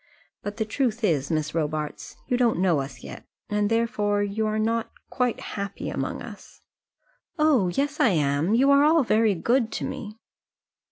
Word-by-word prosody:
But 205 +1 -6
the 220 - -1
truth 240 0 -1
is, 150 -9 +1
Miss 155 -1 -1
Robarts, 155 -2 -3
you 250 - 0
don't 240 -5 +2
know 175 -4 +2
us 135 0 -7
yet, - - -9 0.3
and 210 0 +1
therefore 210 -3 +1
you 210 +2 -1
are 215 0 -1
not 225 +1 0 0.2
quite 250 -3 0
happy 200 -1 -5
among - - -3
us." - - -12 0.8
"Oh! 300 - +3
yes, 275 +10 -1
I - - +5
am; 150 +3 +1
you 270 +4 +4
are 280 0 +6
all 315 0 +5
very 220 -3 +2
good 235 +6 +1
to - - -3
me." 215 -1 -6
215 Hz, 170 wpm, -25 LUFS, 175-240 Hz, 0.8 s, are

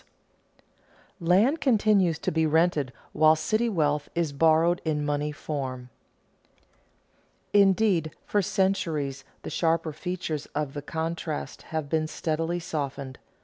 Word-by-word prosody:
[Sidenote: 170 -1 -4
Land 235 - +4
continues 210 - +3
to - - -2
be 160 0 +2
rented 155 -4 +2 0.2
while 155 +1 +5
city 215 +9 0
wealth 150 -6 0
is 165 -4 0
borrowed 165 +3 +3
in 150 -2 -1
money 145 0 -1
form] 130 -4 -5 1.6
Indeed, 195 -4 +4 0.2
for 205 - +1
centuries 160 -8 -1 0.2
the - - -6
sharper 165 -1 0
features 175 -3 -4
of 145 -2 -2
the 145 - -5
contrast 160 +1 -4
have 155 -2 -2
been 155 +1 0
steadily 165 +2 -2
softened. 140 -5 -5
160 Hz, 120 wpm, -27 LUFS, 150-175 Hz, 1.6 s, while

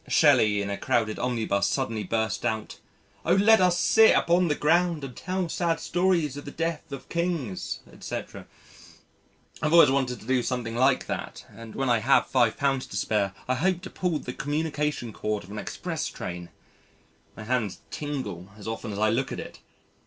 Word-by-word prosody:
Shelley 105 -1 +4
in 100 - -3
a 100 - -4
crowded 110 -3 0
omnibus 115 -5 0
suddenly 115 -6 -1
burst 110 +1 -1
out: 110 -1 -3 0.4
"O - - +3
let 215 +2 +6
us 180 -1 +4
sit 220 +4 +6
upon 175 +1 +3
the 150 - +1
ground 165 0 +2
and 130 -3 -7
tell 185 -1 -2
sad 165 0 0
stories 175 -6 +1
of 145 - -8
the - - -6
deaths 165 +1 -3
of 140 -2 -7
Kings, 170 - -2
etc." - - -7 1.1
I've 150 +1 +1
always 165 -5 +8
wanted 130 -2 0
to - - -14
do 130 +1 +2
something 120 -2 -3
like 130 +2 +3
that - - -5
and 115 -1 -10
when 135 - -1
I 120 -2 +3
have 120 +6 +4
£5 130 +2 +1
to 100 - -5
spare 100 -2 0
I 130 - +2
hope 180 +6 0
to 190 - -8
pull 180 -4 -1
the 125 -3 -6
communication 150 -5 -2
cord 105 -1 -2
of 95 - -13
an 105 - -5
express - - -4
train 85 0 -6 0.9
my - - -7
hands 110 -6 -1
tingle 130 - -5
as 105 - -10
often 110 0 -4
as 100 - -5
I 110 +1 +3
look 130 +4 -1
at - - -4
it. - - -9
130 Hz, 180 wpm, -26 LUFS, 110-165 Hz, 1.1 s, always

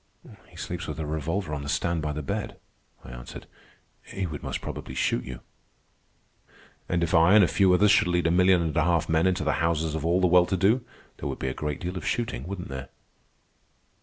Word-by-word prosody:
"He - - -19
sleeps 90 +1 -5
with 75 - -5
a 80 - -2
revolver 80 +3 -3
on 75 - -3
the 70 - -6
stand 85 +1 0
by 75 -1 -2
the 75 0 -4
bed," - - -4 0.5
I - - -9
answered. - - -9 0.6
"He 95 - -5
would 80 -4 -6
most - - -4
probably 65 - -7
shoot 60 - 0
you." 65 -1 -8 1.5
"And 85 -1 +1
if 85 - -1
I 85 +5 +6
and 105 - +8
a - - +4
few 90 +4 +3
others 100 +3 +5
should 105 - +4
lead 90 -1 +1
a 80 - +3
million 90 0 +4
and 80 -2 -3
a 80 - +3
half 85 -1 +2
of - - -14
men 80 +2 +3
into 90 -2 0
the 80 - +1
houses 80 -2 0
of 80 -2 -3
all 85 +3 +2
the 95 - +3
well 90 0 +5
to 95 - 0
do, 110 +7 +3 0.3
there - - -4
would - - -4
be 65 - -2
a - - -3
great 75 +4 -4
deal 90 +1 -4
of - - -5
shooting, 85 - -2
wouldn't 95 -2 -6
there?" 65 0 -6
85 Hz, 230 wpm, -26 LUFS, 75-90 Hz, 1.5 s, and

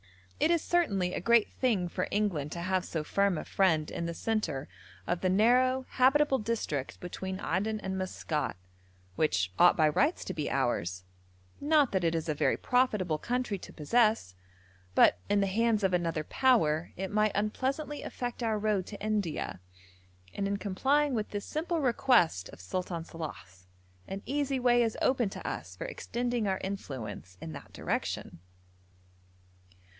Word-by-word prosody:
It - - +3
is 335 -2 +2
certainly 200 - +1
a - - -2
great 235 -2 +4
thing 215 -9 +1
for 180 +1 -2
England 180 -9 -1
to 170 - -5
have 185 0 0
so 160 -4 -3
firm 200 +2 +1
a - - -5
friend 160 -6 +2
in 170 - -3
the 170 - -4
centre 165 -12 -2 0.4
of 175 0 -1
the 185 - +2
narrow 250 +6 +3
habitable 270 +2 +3
district 210 - -3
between 190 +1 -5
Aden 205 +4 -1
and 190 -1 -3
Maskat, 165 - -2 0.6
which 95 - +1
ought 175 - +7
by 155 -2 +5
rights 285 - +1
to - - -3
be 150 -3 -2
ours, 90 -9 -1 0.6
not 295 -2 +3
that 190 -2 0
it 165 0 +2
is 165 0 -2
a 155 - +1
very 145 - +1
profitable 210 -11 +1
country 245 -3 -2
to - - -10
possess, 215 - +2 0.6
but 90 - +6
in 205 - +3
the 200 - +3
hands 215 +2 +1
of 190 -1 +2
another 165 -3 0
power 175 - +2
it 190 0 -3
might 215 0 +2
unpleasantly 270 +8 -1
affect 245 0 -5
our 225 -2 +1
road 205 -3 0
to 205 - -8
India, 205 - -2 0.7
and 200 - -1
in 200 0 -1
complying 270 +9 +1
with 215 -3 -1
this 205 -1 -4
simple 330 +2 -2
request 235 - +3
of - - -13
Sultan 170 - -3
Salàh's 95 - -9 0.4
an 195 +1 -6
easy 280 0 0
way 245 -1 +4
is 225 -2 0
open 250 -5 +2
to - - -7
us - - -5
for - - -6
extending 245 - -2
our 190 -1 +1
influence 120 - -6
in 165 - -7
that 145 -2 -10
direction. - - -3
200 Hz, 165 wpm, -30 LUFS, 165-240 Hz, 0.7 s, ought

